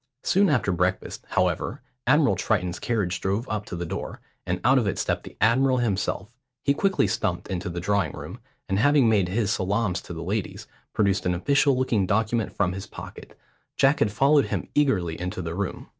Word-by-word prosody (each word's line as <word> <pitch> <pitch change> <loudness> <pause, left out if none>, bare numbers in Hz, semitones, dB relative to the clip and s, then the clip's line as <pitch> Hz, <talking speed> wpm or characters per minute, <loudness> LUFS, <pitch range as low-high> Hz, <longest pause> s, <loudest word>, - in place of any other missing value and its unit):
Soon 195 0 +3
after 125 -9 +2
breakfast, 90 +1 -1
however, - - -1 0.2
Admiral 140 -6 +4
Triton's 90 -2 -1
carriage 95 -7 -1
drove 100 +6 -1
up 105 -1 -3
to - - -5
the 85 0 -4
door, - - -5 0.3
and 90 +1 -1
out 130 +3 +5
of 115 - -1
it 95 - -1
stepped - - -1
the - - -12
admiral 130 +4 +3
himself. 105 -1 -2 0.3
He 140 - +3
quickly 195 +5 +1
stumped - - -2
into 95 0 -3
the 85 0 -4
drawing 95 -3 0
room, - - -8 0.3
and 95 +1 0
having 140 0 +4
made 100 -5 +2
his 105 +1 0
salaams 100 -1 0
to - - -9
the 80 0 -6
ladies, 100 +3 -3 0.3
produced 100 -3 +1
an 90 - +1
official 140 +7 +2
looking 115 -7 +1
document 110 +3 0
from 95 -3 0
his 95 +2 -6
pocket. - - -11 0.4
Jack 140 +2 +4
had 105 - +2
followed 140 +6 +4
him - - -3
eagerly 95 - +1
into 90 +2 -4
the 85 -2 -4
room. 100 +1 -4
105 Hz, 190 wpm, -25 LUFS, 90-125 Hz, 0.4 s, out